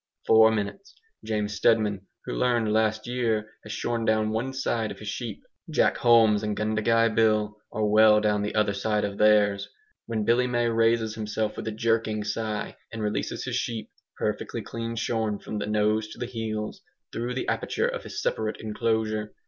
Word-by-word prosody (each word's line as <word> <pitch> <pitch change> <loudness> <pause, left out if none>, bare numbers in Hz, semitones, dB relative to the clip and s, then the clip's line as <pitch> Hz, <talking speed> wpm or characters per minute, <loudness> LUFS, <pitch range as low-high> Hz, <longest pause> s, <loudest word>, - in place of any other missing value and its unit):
Four 110 0 +7
minutes 110 - -4 0.3
James 105 -1 -2
Steadman, 105 -2 +2 0.2
who - - -4
learned 115 - +1
last 110 0 +1
year, 115 -3 -1
has 105 - -9
shorn 115 +1 -2
down 110 -1 +2
one 115 +5 -1
side 115 -4 -1
of - - -7
his 105 - -9
sheep; 115 -2 -5 0.3
Jack - - +2
Holmes 115 -3 +5
and 105 -1 -2
Gundagai 110 +1 +2
Bill 110 -1 +2 0.2
are 110 0 -1
well 105 0 +6
down 105 -1 +1
the 105 - -3
other 105 -2 +2
sides 105 +1 0
of 100 -1 -5
theirs; 105 -2 +4 0.4
when 110 -2 -1
Billy 125 +2 +3
May 120 -1 +1
raises 115 -1 +2
himself 110 0 -2
with - - -6
a - - -1
jerking 110 -1 0
sigh, 105 +1 -3
and 110 -1 -5
releases 105 0 -2
his - - -2
sheep, 115 -2 -4 0.3
perfectly - - -3
clean 115 0 -5
shorn 110 -2 -1
from 105 - -5
the 105 - -3
nose 105 +1 +1
to 110 - -11
the 120 - -3
heels, 110 -3 -4 0.3
through 120 +2 -3
the 130 - -3
aperture - - 0
of - - -3
his - - -6
separate 110 -1 -1
enclosure. 110 -1 -1
110 Hz, 180 wpm, -26 LUFS, 105-115 Hz, 0.4 s, Four